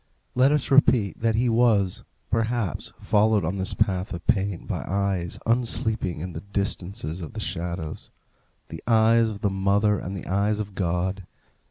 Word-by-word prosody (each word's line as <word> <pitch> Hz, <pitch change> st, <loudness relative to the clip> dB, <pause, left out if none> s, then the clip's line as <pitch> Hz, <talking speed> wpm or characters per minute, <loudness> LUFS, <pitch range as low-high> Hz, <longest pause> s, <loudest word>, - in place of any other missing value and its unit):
Let 130 Hz, +3 st, +4 dB
us 150 Hz, -3 st, 0 dB
repeat 120 Hz, -7 st, +4 dB
that 115 Hz, -1 st, +1 dB
he 120 Hz, +3 st, +2 dB
was, 110 Hz, -5 st, +2 dB, 0.3 s
perhaps, 115 Hz, -, 0 dB
followed 105 Hz, -2 st, +2 dB
on 90 Hz, +5 st, -2 dB
this 95 Hz, -1 st, -2 dB
path 95 Hz, -1 st, 0 dB
of 85 Hz, -, -9 dB
pain 100 Hz, -3 st, 0 dB
by -, -, -3 dB
eyes 95 Hz, -2 st, -1 dB
unsleeping 115 Hz, -, 0 dB
in 90 Hz, 0 st, -5 dB
the 80 Hz, -, -6 dB
distances 95 Hz, -4 st, -3 dB
of 80 Hz, -, -7 dB
the -, -, -6 dB
shadows 85 Hz, -2 st, -4 dB, 0.6 s
the -, -, -8 dB
eyes 115 Hz, 0 st, +4 dB
of 105 Hz, -1 st, -7 dB
the 100 Hz, -4 st, +1 dB
mother 100 Hz, +1 st, +2 dB
and 95 Hz, +2 st, -5 dB
the -, -, -8 dB
eyes 100 Hz, +3 st, 0 dB
of 105 Hz, -2 st, -5 dB
God. 95 Hz, +1 st, -2 dB
100 Hz, 165 wpm, -25 LUFS, 90-110 Hz, 0.6 s, Let